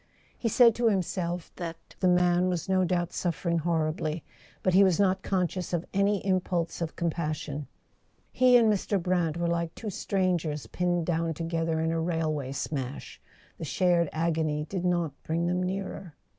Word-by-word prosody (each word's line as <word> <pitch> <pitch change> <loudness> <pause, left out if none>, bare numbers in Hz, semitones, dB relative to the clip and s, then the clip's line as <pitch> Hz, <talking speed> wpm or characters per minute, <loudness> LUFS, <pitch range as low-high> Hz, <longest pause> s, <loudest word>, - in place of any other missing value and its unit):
He 230 - -1
said 235 +1 +6
to 235 0 +2
himself 180 -3 -2
that 165 -2 -5 0.2
the 185 - +2
man 180 0 +3
was 175 -3 -2
no 190 -1 +3
doubt 175 -1 0
suffer¬ 170 0 -2
ing 170 - +2
horribly; 155 -1 -1 0.4
but 185 - +2
he 195 +2 +7
was 185 -2 +3
not 190 -1 +3
conscious 185 -1 -1
of 175 0 0
any 200 0 +1
impulse 180 -3 0
of 165 -1 -3
compassion. 155 -4 -3 0.6
He 250 -1 +6
and 230 -2 +4
Mr. 200 0 0
Brant 175 -2 0
were 170 - -1
like 170 -1 -1
two 215 -3 -5
strangers 175 -6 -1
pinned 175 -2 -1
down 165 -1 0
together 165 0 -1
in 160 0 0
a 165 0 0
railway 155 -5 -1
smash: 140 -1 -5 0.4
the - - -5
shared 170 0 +2
agony 155 -2 0
did 185 -2 -3
not 175 -4 +1
bring 165 +2 -1
them 180 +1 0
nearer. 185 -3 -4
175 Hz, 170 wpm, -28 LUFS, 160-185 Hz, 0.6 s, he